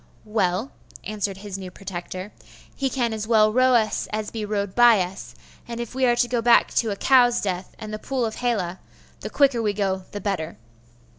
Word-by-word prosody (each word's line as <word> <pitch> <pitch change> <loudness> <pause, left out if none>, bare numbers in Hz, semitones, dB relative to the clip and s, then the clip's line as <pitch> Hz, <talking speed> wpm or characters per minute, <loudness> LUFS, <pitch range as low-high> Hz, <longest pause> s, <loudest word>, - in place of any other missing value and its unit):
'Well,' 210 +2 0 0.3
answered 205 -2 -3
his 195 -1 -7
new 185 -1 -7
protector, 185 +1 -7 0.4
'he 270 -1 -1
can 240 -4 -1
as 215 -1 -4
well 215 -2 +4
row 255 +1 +4
us 220 -2 +1
as 215 0 -3
he 220 -2 -4
rowed 205 -2 -2
by 240 -2 +6
us; 185 +2 -5 0.3
and 235 0 -6
if 235 -1 -5
we 260 0 +2
are 240 - +4
to 240 - +2
go 240 -1 0
back 235 0 +4
to 230 - +1
a 200 - -2
cow's 245 +1 +4
death 185 -2 -4
and 215 -1 -7
the 215 - -4
pool 260 -1 -2
of 220 - -4
Hela, 195 -8 -1 0.4
the - - -6
quicker 275 -5 +3
we 210 -2 0
go 190 -2 -1
the 205 - -5
better. 180 - -3
215 Hz, 205 wpm, -24 LUFS, 195-240 Hz, 0.4 s, by